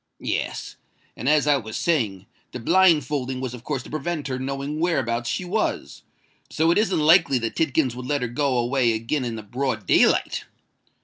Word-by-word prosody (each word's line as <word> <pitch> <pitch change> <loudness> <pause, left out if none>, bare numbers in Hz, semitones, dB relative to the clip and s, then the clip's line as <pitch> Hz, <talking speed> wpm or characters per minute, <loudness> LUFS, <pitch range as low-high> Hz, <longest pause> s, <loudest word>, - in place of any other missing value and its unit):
"Yes. - - -3 0.4
And, 125 - -2
as 150 -1 +4
I 145 -1 +4
was 110 -4 -6
saying, 110 - 0 0.3
the 125 - -5
blindfolding 145 -4 +2
was 130 -2 -4
of 120 -2 -10
course 135 -4 -3
to - - -12
prevent 155 0 -3
her 130 -1 -3
knowing 140 +3 -4
whereabouts 120 -9 0
she 180 - -2
was: 205 +5 -2 0.5
so 160 +2 +2
it 175 - +3
isn't 200 -6 +1
likely 155 -3 +5
that 115 -2 -3
Tidkins 140 -4 +1
would 125 0 -7
let 145 -2 0
her - - 0
go 130 +2 0
away 120 0 +2
again 115 +6 -2
in 120 -2 -3
the 110 - -7
broad 120 -1 -3
day - - +5
light." - - -1
135 Hz, 190 wpm, -23 LUFS, 120-155 Hz, 0.5 s, likely